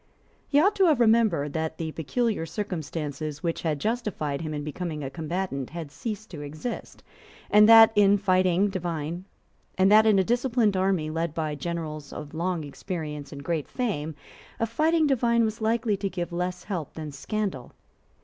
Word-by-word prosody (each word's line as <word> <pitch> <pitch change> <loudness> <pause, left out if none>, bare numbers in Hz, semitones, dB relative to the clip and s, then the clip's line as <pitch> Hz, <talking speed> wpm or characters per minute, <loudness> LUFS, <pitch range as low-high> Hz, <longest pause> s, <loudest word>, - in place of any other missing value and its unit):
He 285 - +3
ought 395 +7 +4
to 385 - +5
have 310 -7 +4
remembered 220 - +3
that 160 0 -2
the 160 -1 -3
peculiar 210 - -1
circumstances 155 -5 -4
which 165 -1 -1
had 155 -3 -1
justified 185 - -2
him 155 -1 -4
in 150 -1 -4
becoming 155 0 -4
a 135 - -5
combatant 160 -3 -3
had 165 -3 -7
ceased 215 - -6
to 155 -5 -7
exist, 155 +11 -6 0.5
and 210 +1 +7
that, 225 -1 +9
in 205 0 +5 1.6
a 205 +1 +5
disciplined 235 -1 +1
army 185 -5 +1
led 165 0 -2
by 155 -2 -2
generals 155 -1 -5
of 145 - -8
long 170 0 -1
experience 150 -1 -6
and 140 -1 -8
great 160 -1 -2
fame 160 -11 -3 0.4
a 230 - +2
fighting 315 +8 +2
divine 235 -4 +3
was 220 +1 -4
likely 220 -1 +1
to 195 0 -2
give 175 -2 -4
less 180 +1 -3
help 175 -8 -5
than 155 -2 -6
scandal. 185 - -4
175 Hz, 155 wpm, -26 LUFS, 155-220 Hz, 1.6 s, that